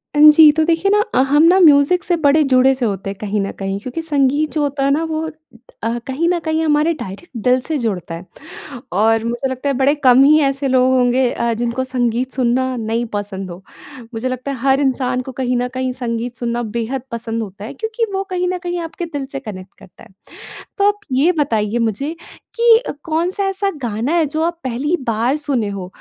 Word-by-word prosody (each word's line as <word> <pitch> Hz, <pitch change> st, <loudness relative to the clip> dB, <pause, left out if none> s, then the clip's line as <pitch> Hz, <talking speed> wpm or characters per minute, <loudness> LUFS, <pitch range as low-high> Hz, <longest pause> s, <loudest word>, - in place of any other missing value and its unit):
अ, -, -, +1 dB
जी 305 Hz, 0 st, +9 dB
तो 315 Hz, -, +4 dB
देखिए 335 Hz, +4 st, +1 dB
ना 415 Hz, -, +4 dB
अ, -, -, +4 dB
हम 295 Hz, +3 st, +4 dB
ना 360 Hz, +3 st, +5 dB
म्यूज़िक 305 Hz, +1 st, +5 dB
से 350 Hz, -, +1 dB
बड़े 295 Hz, +2 st, +5 dB
जुड़े 265 Hz, -1 st, +4 dB
से 255 Hz, -2 st, -2 dB
होते 195 Hz, -2 st, -3 dB
हैं 195 Hz, -, -6 dB
कहीं 210 Hz, 0 st, -1 dB
न 195 Hz, -, -3 dB
कहीं 195 Hz, 0 st, -3 dB
क्योंकि 255 Hz, +9 st, -5 dB
संगीत 295 Hz, -1 st, +1 dB
जो 310 Hz, -, 0 dB
होता 285 Hz, -1 st, -1 dB
है 275 Hz, -, +2 dB
ना 305 Hz, +4 st, +1 dB
वो 315 Hz, -1 st, -2 dB
अ, 240 Hz, -7 st, -7 dB
कहीं 280 Hz, +6 st, -1 dB
न 355 Hz, -1 st, +1 dB
कहीं 315 Hz, 0 st, 0 dB
हमारे 305 Hz, +1 st, +2 dB
डायरेक्ट 205 Hz, -, -9 dB
दिल 255 Hz, +1 st, +3 dB
से 315 Hz, -, -1 dB
जुड़ता 195 Hz, -, -3 dB
है। 170 Hz, +3 st, -9 dB, 0.7 s
और 225 Hz, +3 st, +2 dB
मुझे 240 Hz, +3 st, -2 dB
लगता 260 Hz, +2 st, -3 dB
है 280 Hz, -, +1 dB
बड़े 275 Hz, +2 st, +3 dB
कम 255 Hz, +1 st, +7 dB
ही 305 Hz, +2 st, +6 dB
ऐसे 275 Hz, 0 st, 0 dB
लोग 255 Hz, 0 st, +3 dB
होंगे 250 Hz, 0 st, +2 dB
अ, 235 Hz, 0 st, -1 dB
जिनको 240 Hz, +3 st, -2 dB
संगीत 250 Hz, 0 st, -1 dB
सुनना 255 Hz, +1 st, 0 dB
नहीं 230 Hz, +1 st, -2 dB
पसंद 200 Hz, -2 st, -4 dB
हो। 175 Hz, +2 st, -10 dB, 0.5 s
मुझे 225 Hz, +3 st, -2 dB
लगता 255 Hz, +2 st, -4 dB
है 275 Hz, -, -3 dB
हर 270 Hz, +1 st, +4 dB
इंसान 255 Hz, -2 st, 0 dB
को -, -, -5 dB
कहीं 250 Hz, -1 st, 0 dB
न 245 Hz, +1 st, -1 dB
कहीं 255 Hz, 0 st, -2 dB
संगीत 240 Hz, -1 st, -4 dB
सुनना 240 Hz, -1 st, -2 dB, 0.2 s
बेहद 240 Hz, +3 st, -3 dB
पसंद 230 Hz, 0 st, -3 dB
होता 200 Hz, -1 st, -8 dB
है -, -, -7 dB
क्योंकि 450 Hz, +1 st, -2 dB
वो 385 Hz, 0 st, -1 dB
कहीं 360 Hz, -1 st, -1 dB
न 365 Hz, 0 st, -2 dB
कहीं 350 Hz, -1 st, -3 dB
आपके 335 Hz, +1 st, -6 dB
दिल 285 Hz, -1 st, -2 dB
से 275 Hz, -, -4 dB
कनेक्ट 190 Hz, -6 st, -9 dB
करता 195 Hz, -2 st, -17 dB
है। -, -, -19 dB, 0.7 s
तो 400 Hz, 0 st, +4 dB
आप 415 Hz, 0 st, 0 dB
ये 275 Hz, +7 st, +3 dB
बताइए 225 Hz, -5 st, 0 dB
मुझे 275 Hz, +9 st, -4 dB, 0.4 s
कि 465 Hz, 0 st, +5 dB, 0.2 s
कौन 330 Hz, +1 st, 0 dB
सा 400 Hz, +1 st, -2 dB
ऐसा 390 Hz, +1 st, 0 dB
गाना 235 Hz, +4 st, -2 dB
है 335 Hz, -2 st, +2 dB
जो 310 Hz, +3 st, -2 dB
आप 340 Hz, 0 st, -2 dB
पहली 265 Hz, +7 st, -1 dB
बार 230 Hz, +4 st, +1 dB
सुने 275 Hz, -8 st, -1 dB
हो? 195 Hz, -2 st, -6 dB
260 Hz, 220 wpm, -18 LUFS, 235-310 Hz, 0.7 s, जी